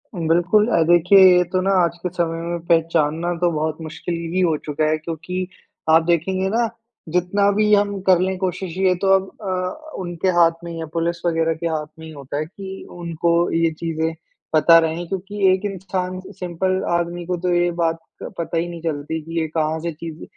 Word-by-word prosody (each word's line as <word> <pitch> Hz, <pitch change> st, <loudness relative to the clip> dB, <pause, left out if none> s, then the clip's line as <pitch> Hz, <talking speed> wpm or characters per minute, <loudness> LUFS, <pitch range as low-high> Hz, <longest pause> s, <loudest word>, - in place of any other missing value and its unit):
बिल्कुल। 175 Hz, +5 st, +2 dB
अ, 200 Hz, -8 st, +2 dB
देखिए 175 Hz, +3 st, +6 dB, 0.2 s
ये 180 Hz, -, +4 dB
तो 185 Hz, 0 st, +1 dB
ना 195 Hz, -, +1 dB
आज 170 Hz, 0 st, -1 dB
के 180 Hz, -, -1 dB
समय 165 Hz, -1 st, -1 dB
में 170 Hz, +1 st, -3 dB
पहचानना 165 Hz, 0 st, +1 dB
तो 175 Hz, -1 st, +3 dB
बहुत 155 Hz, 0 st, -2 dB
मुश्किल 160 Hz, +2 st, -5 dB, 0.2 s
ही 185 Hz, -, +1 dB
हो 165 Hz, -3 st, +3 dB
चुका 155 Hz, +1 st, -1 dB
है। 155 Hz, -, +1 dB
क्योंकि 170 Hz, +3 st, -5 dB, 0.4 s
आप 160 Hz, +1 st, +6 dB
देखेंगे 185 Hz, +3 st, +1 dB
ना, 230 Hz, +2 st, +1 dB, 0.4 s
जितना 180 Hz, +4 st, +2 dB
भी 210 Hz, +1 st, +2 dB
हम 205 Hz, -1 st, +2 dB
कर 185 Hz, -2 st, +6 dB
ले 190 Hz, +1 st, 0 dB
कोशिश 185 Hz, -1 st, -3 dB
ये 190 Hz, -1 st, +3 dB
तो 195 Hz, -, +1 dB
अब 190 Hz, 0 st, -1 dB
अ, 190 Hz, +11 st, -4 dB
उनके 175 Hz, 0 st, -3 dB
हाथ 165 Hz, -1 st, +6 dB
में 170 Hz, -, -6 dB
ही 165 Hz, -, -6 dB
है, 160 Hz, -, -4 dB
पुलिस 170 Hz, 0 st, -1 dB
वग़ैरह 165 Hz, -1 st, +1 dB
के 165 Hz, +1 st, -4 dB
हाथ 155 Hz, -2 st, -2 dB
में 160 Hz, -, -9 dB
ही 160 Hz, -, -9 dB
होता 140 Hz, -1 st, -6 dB
है 155 Hz, -, -1 dB
कि 190 Hz, +3 st, -9 dB
उनको 170 Hz, 0 st, 0 dB
ये 165 Hz, 0 st, +2 dB
चीज़ें 160 Hz, -1 st, -2 dB, 0.4 s
पता 160 Hz, +2 st, +7 dB
रहें। 165 Hz, +1 st, -2 dB
क्योंकि 195 Hz, +2 st, -1 dB
एक 190 Hz, +2 st, -2 dB
इंसान, 185 Hz, -1 st, -3 dB, 0.2 s
सिंपल 185 Hz, +1 st, -1 dB
आदमी 175 Hz, 0 st, -3 dB
को 180 Hz, 0 st, -2 dB
तो 180 Hz, +1 st, 0 dB
ये 175 Hz, 0 st, +2 dB
बात 165 Hz, 0 st, +1 dB, 0.3 s
पता 165 Hz, 0 st, -4 dB
ही 165 Hz, +1 st, 0 dB
नहीं 170 Hz, -1 st, -8 dB
चलती 160 Hz, 0 st, -3 dB
कि 165 Hz, +2 st, -4 dB
ये 160 Hz, -, -1 dB
कहाँ 155 Hz, 0 st, -1 dB
से 170 Hz, +1 st, -3 dB
चीज़, 160 Hz, 0 st, -8 dB
170 Hz, 205 wpm, -21 LUFS, 165-185 Hz, 0.4 s, पता